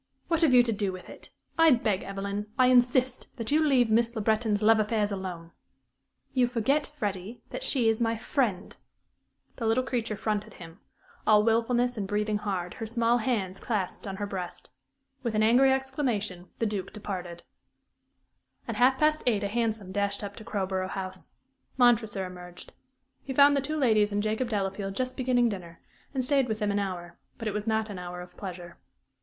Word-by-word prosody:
"What 330 -1 +2
have 320 -5 +5
you 250 -1 +7
to 235 - -1
do 205 -2 -1
with 185 -1 -9
it? - - -12 0.3
I 325 0 +7
beg, 220 -7 +2
Evelyn 200 +1 -4
I 255 -1 +5
insist 250 +1 +3
that 230 0 -3
you 310 +2 +4
leave 255 -6 +3
Miss 230 +2 +2
Le 220 - -2
Breton's 215 -1 +1
love 220 +1 +6
affairs 215 -1 +1
alone." 180 -4 -5 0.8
"You 255 -2 +3
forget, 250 +5 +1
Freddie, 205 0 -4
that - - -5
she 250 -5 +3
is 225 +1 +2
my 230 0 +1
friend." 215 -6 -1 0.8
The 230 - -2
little 230 +3 +2
creature 230 -4 -2
fronted 210 -1 -2
him, 165 +1 -12 0.5
all 210 -1 +6
wilfulness 240 +2 +1
and 200 -2 -2
breathing 210 +1 0
hard, 190 -4 -3
her 225 - -6
small 235 +1 +2
hands 210 -6 -1
clasped 205 -4 -3
on 195 - -4
her 205 - -3
breast. 185 -3 -6 0.5
With 235 -3 -2
an 215 - +3
angry 250 +5 +5
exclamation 250 -9 -2
the 230 - 0
Duke 205 -3 -3
departed. 180 -5 -6 1.2
At - - -3
half 260 +2 +4
past 305 +2 +2
eight 210 -4 +2
a - - 0
hansom 220 -3 -2
dashed 200 +1 -1
up 200 0 -6
to 220 - -8
Crowborough 190 -3 -2
House. 190 -1 -6 0.4
Montresor 225 -6 +3
emerged. 180 -1 -10 0.5
He 265 -1 -5
found 285 +1 +7
the 280 - +2
two 305 +3 -3
ladies 215 -7 +3
and 205 0 0
Jacob 220 +3 -1
Delafield 195 -2 -2
just 255 +2 -2
beginning 250 -2 +2
dinner, 175 -5 -7 0.3
and 260 -3 -1
stayed 275 -1 +2
with 220 -2 -2
them 210 -1 0
an 205 - 0
hour; 175 -3 -5 0.2
but 225 - -5
it 210 - -1
was 210 +1 -3
not 220 0 +1
an 190 - -6
hour 180 0 -6
of 180 - -12
pleasure. 175 -3 -8
215 Hz, 185 wpm, -28 LUFS, 195-245 Hz, 1.2 s, you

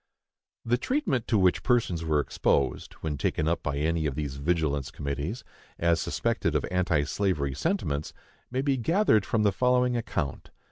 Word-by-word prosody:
The 120 +1 +2
treatment 255 - 0
to 110 - +2
which 95 -2 +3
persons 110 -10 +1
were 80 -2 +2
exposed, 70 -1 0
when 75 -3 -3
taken 75 - 0
up 85 +1 +1
by 70 -1 -2
any 80 +1 0
of 70 - -3
these 70 -2 -4
vigilance 70 -3 0
committees, 70 - -4 0.3
as 85 -2 +2
suspected - - -1
of - - +1
anti 90 -5 +2
slavery 75 -5 -1
sentiments, 75 - -1 0.4
may 130 +2 -1
be 140 -2 +1
gathered 125 - +3
from 110 -2 +1
the 105 - +4
following 125 +2 +2
account. 75 - -3
85 Hz, 160 wpm, -27 LUFS, 75-120 Hz, 0.4 s, the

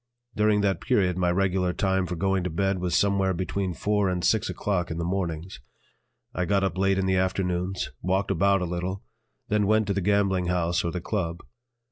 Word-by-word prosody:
During 105 -1 +3
that 100 -1 0
period 90 -3 +2
my 90 -1 +1
regular 90 0 +1
time 95 -1 0
for 90 - -3
going 95 +2 0
to - - -1
bed 95 +3 0
was 90 -1 -1
somewhere 100 -2 +2
between 95 0 -2
four 105 0 +1
and 90 -1 -1
six 110 -3 +2
o'clock 95 -4 -1
in 80 - -4
the 85 - -2
mornings. 90 -2 -3 0.7
I 90 - -1
got 100 +1 +1
up 95 -4 -1
late 95 0 +2
in 95 - 0
the 95 0 +2
afternoons, 95 0 -1
walked 95 +3 0
about 100 +1 +3
a - - 0
little, 90 +3 -4 0.5
then 105 -1 +2
went 110 +1 +3
to 100 - -1
the 100 - -1
gambling 95 -2 +1
house 85 0 0
or 85 - -1
the 90 - -4
"Club." 85 -4 -3
95 Hz, 200 wpm, -26 LUFS, 90-100 Hz, 0.7 s, During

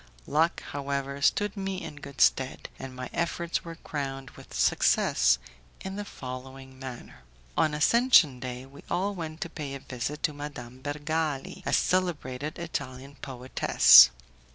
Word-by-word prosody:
Luck, 160 +3 +1
however, 140 0 -3
stood 205 +7 +2
me 195 -1 -4
in 145 - -8
good 140 -1 -7
stead, 130 0 +2
and 130 -1 -8
my 130 0 -5
efforts 170 0 -1
were 165 -1 -8
crowned 135 -4 -5
with - - -15
success - - +3 0.4
in 190 0 -6
the 205 - -4
following 130 -4 -9
manner. 130 - -9 0.4
On 155 -1 +2
Ascension 160 - +5
Day, 125 0 -6
we 140 +1 -14
all 195 +3 0
went 160 -4 -6
to 175 - -3
pay 145 -4 -5
a - - -6
visit 135 +3 -5
to 155 - +1
Madame 130 -4 -8
Bergali, 150 0 -3
a - - 0
celebrated 155 -6 0
Italian 140 -4 -6
poetess. 125 - +7
140 Hz, 145 wpm, -28 LUFS, 130-165 Hz, 0.4 s, poetess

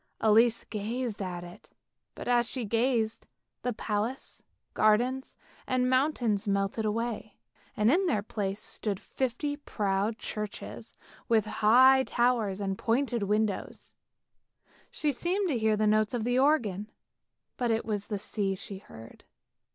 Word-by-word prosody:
Elise 225 +2 +4
gazed 220 +1 -4
at 180 -2 -4
it, 175 0 -12 0.5
but - - -7
as 240 -1 +3
she 255 -4 -4
gazed 230 0 0 0.3
the 250 - -1
palace, 220 +3 -3 0.3
gardens 245 +5 +2 0.3
and 255 -1 +1
mountains 245 -6 +1
melted 200 +2 0
away, 220 -1 -3 0.4
and 215 +3 +4
in 370 +4 +3
their 215 -11 +1
place 200 -2 -3
stood 205 -3 -3 0.2
twenty 265 +3 -1
proud 205 -5 -1
churches 210 -3 -6 0.3
with 225 -2 +4
their 215 - -7
high 260 +5 +6
towers 235 -6 +1
and 195 -1 -2
pointed 240 0 0
windows. 210 0 -1 1.0
She 300 - -1
seemed 365 +8 -1
to 255 -6 0
hear 220 -1 +3
the 215 - +2
notes 215 +2 +2
of 230 - -1
the 245 +2 +2
organ, 225 -8 +2 0.7
but 245 -2 -1
it 225 0 0
was 205 -2 -3
the 210 - -2
sea 195 -1 -2
she 190 +1 -8
heard. 115 - -13
220 Hz, 140 wpm, -29 LUFS, 205-250 Hz, 1.0 s, high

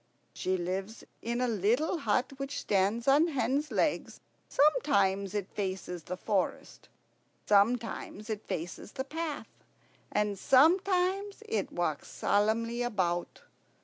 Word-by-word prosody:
"She 185 0 -1
lives 190 +5 -4 0.2
in 235 +1 -2
a 250 - +2
little 235 - +1
hut 260 -2 +1
which 275 +1 -4
stands 205 +5 +1
on 290 +5 +5
hen's 275 0 0
legs. - - 0 0.3
Sometimes 200 - +2
it 200 -2 -1
faces 185 -3 -3
the 180 - -4
forest, 195 0 -2 0.6
sometimes 215 0 +1
it 215 -2 -4
faces 170 +5 -5
the 265 - -3
path, 310 +1 -6 0.5
and 210 -2 0
sometimes 375 +7 +3
it 445 - -1
walks - - -2
solemnly 230 +3 +1
about. 185 -7 -1
230 Hz, 115 wpm, -30 LUFS, 200-285 Hz, 0.6 s, on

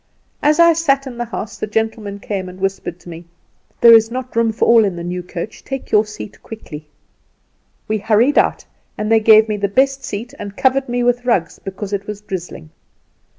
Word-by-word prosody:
As 300 +2 +2
I 335 0 +7
sat 280 -4 +1
in 260 -2 -7
the 240 - -1
house 220 -2 -6
the - - -3
gentlemen 215 -1 -2
came 195 -2 -4
and 185 +1 -12
whispered 190 -2 -3
to - - -12
me, 170 +1 -9 0.6
'There 235 -1 +9
is 225 0 +6
not 255 0 -6
room 230 -1 +2
for 220 - 0
all 230 -1 +6
in 195 -4 -1
the 170 - -6
new 180 +1 -4
coach, 180 +3 -7
take 270 -1 -6
your 210 0 +3
seat 210 -1 -10
quickly.' 155 -9 -10 1.0
We 215 0 -1
hurried 225 +7 +3
out, - - 0 0.3
and 210 +1 -2
they 225 - +6
gave 220 0 +6
me 215 -1 -2
the 200 0 0
best 270 +6 +1
seat, 235 0 -6
and 200 -1 -8
covered 270 -1 +1
me 245 0 -1
with 245 0 +1
rugs, 190 -9 0
because 195 +1 -7
it 200 0 -3
was 210 -1 -5
drizzling. 180 - -7
215 Hz, 205 wpm, -18 LUFS, 195-245 Hz, 1.0 s, There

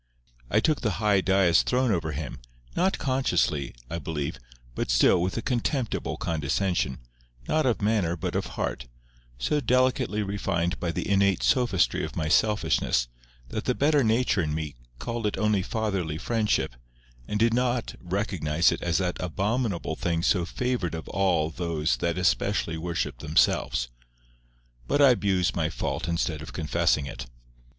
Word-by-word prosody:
I 105 - +3
took 155 +5 +1
the 110 -4 0
high 105 -2 +3
dais 95 -2 +4
throne 125 -1 +1
over 80 -5 0
him, 70 -3 -5 0.4
not 185 +2 +2
consciously, 90 - 0
I 85 - -4
believe, 75 0 -4 0.3
but - - -3
still 60 +9 +4
with 90 +4 -1
a 115 - -2
contemptible 125 0 -1
condescension, 80 -2 -1 0.5
not 155 -3 +2
of 115 -4 0
manner 100 -6 +1
but 80 - -4
of - - -1
heart, - - -3 0.5
so 105 - 0
delicately 125 -3 +1
refined 95 -3 -1
by 85 - -1
the - - -3
innate 100 -1 +2
sophistry 105 - +2
of - - -5
my 75 -1 -1
selfishness, 90 - +2 0.4
that - - -4
the - - +1
better 145 0 +3
nature 110 -3 +2
in 75 -2 -1
me 80 -2 -4 0.2
called 115 - -3
it 105 - -2
only 105 -2 +2
fatherly 95 -7 -2
friendship, 105 - 0 0.5
and 105 - -2
did 115 +1 +3
not 125 -1 0
recognize 90 -4 +1
it - - -3
as 85 -1 +1
that 90 -1 -1
abominable 100 -1 -1
thing 85 +1 -1
so 90 -2 +2
favoured 125 -5 -2
of 80 - -7
all 85 -4 +1
those 80 -2 -1
that 85 0 -1
especially 85 -2 +1
worship 80 -6 -3
themselves. 65 -4 +1 1.0
But - - +1
I 140 -2 +8
abuse 95 -6 +1
my - - 0
fault - - -3
instead 85 -2 -1
of 80 - -9
confessing 75 -2 +1
it. 65 -1 -7
95 Hz, 155 wpm, -26 LUFS, 80-110 Hz, 1.0 s, I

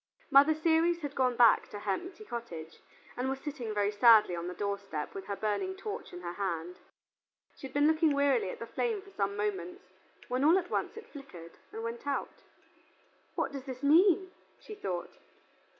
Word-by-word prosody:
Mother 285 +3 +7
Ceres 330 +2 +2
had 290 -2 -4
gone 255 -3 +1
back 235 -1 +5
to 205 - -8
her 205 - -1
empty 365 - -5
cottage, 170 - -7 0.4
and 255 +2 -2
was 270 0 -3
sitting 270 -6 -5
very 205 -1 +1
sadly 210 -3 +6
on 170 0 -4
the 180 - -5
doorstep 200 -7 -4
with 195 - -7
her 200 - -2
burning 215 - -2
torch 415 +2 -6
in 175 - -9
her 175 -1 -5
hand. 180 -3 -4 0.8
She 270 - -8
had 260 - -18
been 290 0 +4
looking 315 -1 +3
wearily 275 -8 +2
at - - -6
the 230 - -6
flame 420 - -2
for 395 - -16
some 200 - -2
moments, 190 -5 -3 0.4
when 250 +2 -1
all 325 +5 +6
at 360 -1 -3
once - - -2
it 450 - -11
flickered 180 - -11
and 225 - -6
went 230 +4 -6
out. 280 - -3 0.9
"What - - -1
does 275 -2 -7
this 260 0 -7
mean?" 365 +5 +5 0.3
she 430 - -10
thought. 185 - -5
250 Hz, 190 wpm, -31 LUFS, 200-315 Hz, 0.9 s, Mother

